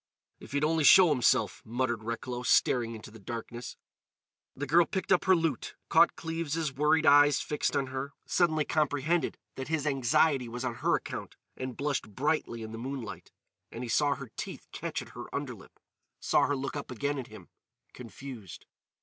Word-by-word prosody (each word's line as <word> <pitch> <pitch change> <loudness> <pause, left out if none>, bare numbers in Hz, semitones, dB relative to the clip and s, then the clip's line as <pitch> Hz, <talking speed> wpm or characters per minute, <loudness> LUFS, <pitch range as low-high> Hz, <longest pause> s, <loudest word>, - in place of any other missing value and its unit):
"If - - -12
he'd 145 +1 +1
only 160 0 +2
show 180 +4 +8
himself," 125 -5 +2
muttered 120 -1 -2
Recklow, 120 +2 -4
staring 120 -2 +2
into 110 0 -10
the 110 - -13
darkness. 120 +3 -7 0.8
The 145 - -3
girl 165 +4 +4
picked 190 -2 -3
up 180 - +4
her 190 0 +6
lute, 165 -7 -2
caught - - +5
Cleves' 165 -2 -3
worried 150 +3 +3
eyes 145 -1 +6
fixed 150 - -1
on 135 - +1
her, 130 +1 -5
suddenly 155 -4 +2
comprehended 155 +1 0 0.2
that 130 - -4
his 155 -2 -1
anxiety 135 -1 +2
was 120 +2 -5
on 120 - -1
her - - +3
account, - - -6 0.2
and 130 -1 -6
blushed 140 -8 -2
brightly 140 -5 -1
in 110 - -7
the 115 - -7
moonlight. 130 -3 -6 0.4
And 120 - -6
he 120 - -5
saw 145 +3 +2
her 125 -5 -9
teeth - - -6
catch - - -4
at - - -14
her - - -8
underlip; - - -6 0.4
saw - - +3
her 145 - 0
look 135 +1 -4
up 145 - -5
again 140 +3 -2
at 125 - -6
him, - - -13 0.4
confused. 120 -3 -10
135 Hz, 175 wpm, -30 LUFS, 120-150 Hz, 0.8 s, show